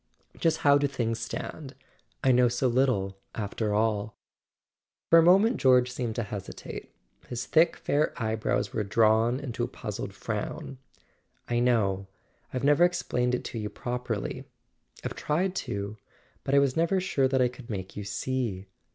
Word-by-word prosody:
"Just 160 -1 +2
how 145 0 +7
do 145 - +2
things 115 -4 -2
stand? 135 +4 -6 0.5
I 130 - +5
know 125 0 +5
so 125 +2 +1
little, 120 -7 +1 0.2
after 105 0 -2
all." 105 0 0 0.9
For 165 - +9
a - - +7
moment 195 +8 +5
George 125 -1 +4
seemed 120 -3 -3
to 120 - -1
hesitate: 100 -2 -7 0.4
his 120 0 -4
thick 165 +2 +4
fair 150 +2 +1
eyebrows 110 -2 -1
were 110 - 0
drawn 110 +4 +3
into 130 - -4
a - - 0
puzzled - - -6
frown. 135 -2 -5 0.7
"I 120 0 +1
know—I've 100 +1 -2
never 145 +4 +5
explained 125 -8 +1
it - - -4
to 115 - -5
you 105 -1 -3
properly. 120 -4 -4 0.6
I've - - -2
tried 180 +5 0
to; 100 +1 -4 0.5
but 135 - +1
I - - +6
was 140 -2 +3
never 170 +4 +2
sure 145 -8 +1
that 130 0 +1
I 125 - +4
could 125 0 -11
make 95 -4 -5
you 105 - -4
see." 100 -1 -2
125 Hz, 160 wpm, -28 LUFS, 110-140 Hz, 0.9 s, For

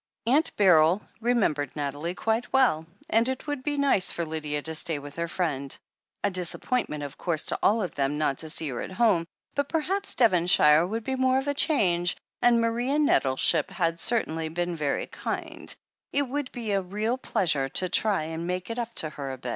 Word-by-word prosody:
Aunt 280 +7 +2
Beryl 180 -1 +4 0.2
remembered 205 - 0
Nathalie 145 +4 -3
quite 225 +4 -1
well, 240 -13 +2 0.2
and 230 +3 +2
it 260 - -4
would 290 -3 -3
be 290 +2 -2
nice 275 -10 +3
for 170 - -3
Lydia 150 -2 -4
to 160 - -4
stay 160 0 0
with 145 0 -10
her 170 0 -2
friend. 145 -6 -2 0.5
A 200 - +1
disappointment, 180 -2 0
of 145 0 -8
course, 165 -4 -1
to - - 0
all 220 +1 +3
of 180 - -4
them, 140 +1 -1
not 145 -3 0
to 160 - -3
see 155 -1 +1
her 125 - -4
at - - -7
home; 190 -6 +2 0.3
but 285 0 -1
perhaps 380 +5 -1
Devonshire 175 -7 +5
would 225 +3 -4
be 265 +3 -2
more 260 0 +2
of 270 +1 -2
a 285 - +1
change, 180 - +2 0.2
and 240 -1 +4
Maria 240 +5 0
Nettleship 135 - +3
had 165 -2 -1
certainly 165 -9 +1
been 175 +1 -2
very 145 -3 -1
kind— - - -4 0.4
it 285 - +1
would 280 0 -4
be 230 -4 -4
a 195 -1 +1
real 210 +7 -2
pleasure 150 - 0
to 185 - +1
try 200 -2 +2
and 165 +2 -5
make 180 +3 -3
it 230 - -4
up 235 -1 -3
to 155 - +1
her 140 -3 -6
a - - -7
bit. 125 -1 -7
180 Hz, 200 wpm, -26 LUFS, 155-240 Hz, 0.5 s, Devonshire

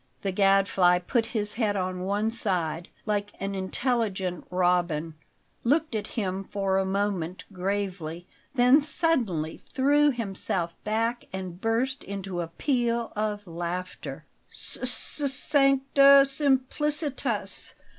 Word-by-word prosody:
The 195 - -1
Gadfly 195 -2 +3
put 225 +6 -1
his 210 -3 -2
head 215 -3 0
on 185 -1 -2
one 205 +4 -1
side, 175 -7 +1 0.2
like 205 -1 -2
an 195 0 -3
intelligent 195 -2 -1
robin, 175 -3 0 0.5
looked 295 +3 +1
at 215 -2 -3
him 195 -2 -2
for 195 -1 -1
a 190 - 0
moment 190 -3 -2
gravely, 180 -3 -3 0.3
then 250 +4 +5
suddenly 245 - +1
threw 290 +2 +2
himself 195 -8 -2
back 230 +3 -1
and 185 -1 -7
burst 235 +4 -1
into 195 -2 -5
a 170 - -4
peal 235 - -1
of 210 -1 -2
laughter. 175 +1 -6 0.2
"S - - -1
s 265 +2 +3
sancta 275 0 +5
simplicitas! 280 +1 -1
205 Hz, 115 wpm, -26 LUFS, 185-250 Hz, 0.5 s, then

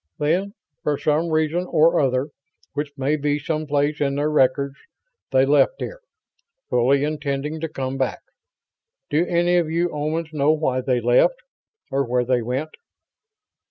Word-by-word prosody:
Then, 180 +7 0 0.3
for 145 -1 0
some 155 +3 +1
reason 160 +3 0
or 165 +1 +4
other 130 +1 +1 0.4
which 145 +1 -3
may 135 +3 +1
be 145 0 0
someplace 150 -1 -1
in 140 -1 +1
their 145 +2 0
records 140 -1 +2 0.6
they 130 0 +4
left 145 - +3
here, - - -6 0.7
fully 135 +4 +3
intending 150 0 -2
to 160 0 -3
come 135 -2 -4
back. 130 - -1 0.9
Do 150 +3 +3
any 175 +1 +2
of 170 -3 +1
you 170 +2 +1
Omans 155 +2 -3
know 150 +1 +3
why 130 -5 0
they 125 -1 0
left? 120 - +4 0.6
Or 140 +1 +1
where 125 -1 0
they 125 -1 +1
went?" 130 +7 -3
150 Hz, 150 wpm, -22 LUFS, 135-160 Hz, 0.9 s, or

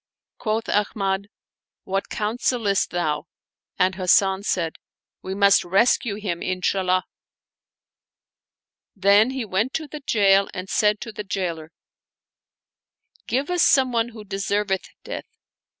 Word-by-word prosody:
Quoth 220 0 -1
Ahmad, 200 -1 0 0.3
" - - -70
What 195 - -1
counselest 215 -1 0
thou? 155 -4 -2 0.3
" - - -59
and 185 +1 +3
Hasan 190 +1 +3
said, 170 -5 -1 0.2
" - - -70
We 190 +1 -5
must 200 0 +5
rescue 200 +3 +2
him, 195 -5 -4
Inshallah! 185 0 0 1.0
" - - -69
Then 200 +3 +5
he 260 -3 -3
went 215 +6 -1
to 320 - -2
the 305 +1 -8
jail 200 -7 +3
and 185 0 -5
said 210 0 +2
to 225 - -6
the 210 - -6
jailer, 175 -5 -4 0.8
" - - -41
Give 275 +7 -1
us 355 -1 +1
some 265 -5 +4
one 230 0 0
who 220 -2 -11
deserveth 195 -1 -2
death." - - -8
200 Hz, 135 wpm, -23 LUFS, 190-220 Hz, 1.0 s, must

